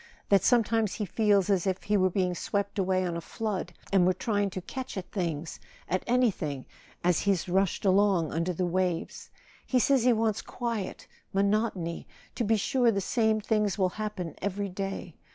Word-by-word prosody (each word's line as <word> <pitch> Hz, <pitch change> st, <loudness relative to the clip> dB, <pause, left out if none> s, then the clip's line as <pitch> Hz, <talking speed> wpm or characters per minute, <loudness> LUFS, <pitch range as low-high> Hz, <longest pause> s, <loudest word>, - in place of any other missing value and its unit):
That 200 Hz, -2 st, +5 dB
sometimes 225 Hz, -3 st, +2 dB
he 210 Hz, -, -2 dB
feels 200 Hz, -1 st, +2 dB
as 190 Hz, -2 st, +1 dB
if 190 Hz, 0 st, -1 dB
he 210 Hz, -, +1 dB
were 185 Hz, -2 st, +4 dB
being 180 Hz, -1 st, 0 dB
swept 200 Hz, +3 st, -2 dB
away 185 Hz, -1 st, +1 dB
on 175 Hz, -1 st, -2 dB
a 170 Hz, -, -3 dB
flood, 215 Hz, +2 st, -3 dB, 0.2 s
and 190 Hz, -2 st, +5 dB
were 185 Hz, +1 st, +4 dB
trying 205 Hz, 0 st, 0 dB
to 185 Hz, -, -5 dB
catch 260 Hz, +4 st, -6 dB
at 185 Hz, -, -6 dB
things—at 175 Hz, -, -4 dB
anything—as 180 Hz, -, -1 dB
he's 195 Hz, -4 st, +1 dB
rushed 190 Hz, +2 st, +1 dB
along 190 Hz, -4 st, +3 dB
under 165 Hz, +3 st, 0 dB
the 180 Hz, +1 st, -1 dB
waves... 180 Hz, -1 st, -2 dB, 0.3 s
He 260 Hz, -, 0 dB
says 260 Hz, 0 st, +3 dB
he 250 Hz, -, +5 dB
wants 220 Hz, -2 st, +1 dB
quiet, 230 Hz, -5 st, -4 dB, 0.3 s
monotony... 200 Hz, -4 st, 0 dB, 0.3 s
to -, -, -2 dB
be 225 Hz, 0 st, +2 dB
sure 245 Hz, +3 st, +2 dB
the 200 Hz, -3 st, +1 dB
same 220 Hz, +2 st, +1 dB
things 210 Hz, -1 st, +1 dB
will 185 Hz, -2 st, +2 dB
happen 205 Hz, -5 st, -5 dB
every 200 Hz, +1 st, -2 dB
day. 195 Hz, -2 st, -5 dB
195 Hz, 170 wpm, -28 LUFS, 180-220 Hz, 0.3 s, That